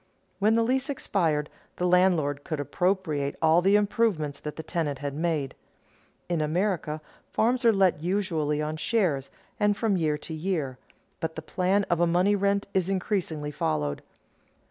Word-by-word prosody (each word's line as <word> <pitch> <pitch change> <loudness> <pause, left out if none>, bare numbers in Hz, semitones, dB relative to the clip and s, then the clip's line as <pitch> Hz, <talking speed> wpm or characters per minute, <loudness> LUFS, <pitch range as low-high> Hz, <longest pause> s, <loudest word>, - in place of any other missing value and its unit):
When 215 +2 +4
the 230 - +3
lease 260 +4 0
expired, 165 - 0 0.3
the 180 - -1
landlord 175 -6 +3
could 155 -3 -4
appropriate 155 -3 0
all 160 +1 +4
the 195 +3 +4
improvements 205 -8 +1
that 150 -1 -6
the 160 - -6
tenant 155 -4 -2
had 140 0 -4
made. 150 -4 -1 0.7
In 170 -3 0
America 155 -1 -1 0.3
farms 245 +3 +2
are 230 - +7
let 190 -6 +2
usually 165 -5 0
on 155 +1 -3
shares, 155 - 0 0.3
and 205 -1 +2
from 220 -4 +1
year 155 -3 +1
to 160 - -8
year, 155 -6 -2 0.4
but 160 0 -3
the 160 - -6
plan 185 +4 +1
of 175 -3 0
a 175 - +4
money 180 +4 +3
rent 200 0 +1
is 190 -1 +1
increasingly 175 -6 -1
followed. 75 - -1
175 Hz, 160 wpm, -27 LUFS, 150-200 Hz, 0.7 s, are